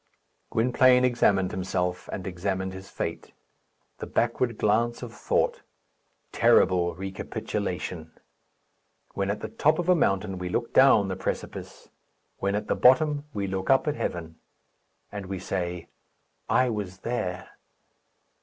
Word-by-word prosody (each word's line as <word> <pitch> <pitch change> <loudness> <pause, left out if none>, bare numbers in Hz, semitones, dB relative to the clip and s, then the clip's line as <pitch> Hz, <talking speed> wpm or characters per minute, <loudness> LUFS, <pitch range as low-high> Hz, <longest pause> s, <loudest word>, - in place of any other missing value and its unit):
Gwynplaine 125 +2 +4
examined 100 -6 +2
himself, 90 -1 -2
and 95 - -5
examined 95 +1 -3
his 95 0 -10
fate. - - -5 0.7
The - - -5
backward 115 0 0
glance 115 +3 +1
of 120 -1 -7
thought; - - 0 0.7
terrible 90 -2 +3
recapitulation! 95 -3 -4 1.0
When 100 0 -2
at 105 - -2
the - - -3
top 155 +2 +2
of 175 0 -2
a - - +8
mountain, 95 - 0
we 90 0 -4
look 115 +5 -2
down 130 -7 +6
the 95 - -3
precipice; 95 - -6 0.5
when 100 +1 0
at 105 - -2
the - - 0
bottom, 145 +3 +4
we 100 -5 -3
look 95 0 -3
up 135 +3 +4
at 150 - 0
heaven. 80 - -4 0.7
And 100 -2 -6
we 95 0 -4
say, 90 -2 -4 0.6
"I 130 - +4
was 95 -3 -5
there." 90 -7 -3
100 Hz, 135 wpm, -26 LUFS, 95-120 Hz, 1.0 s, a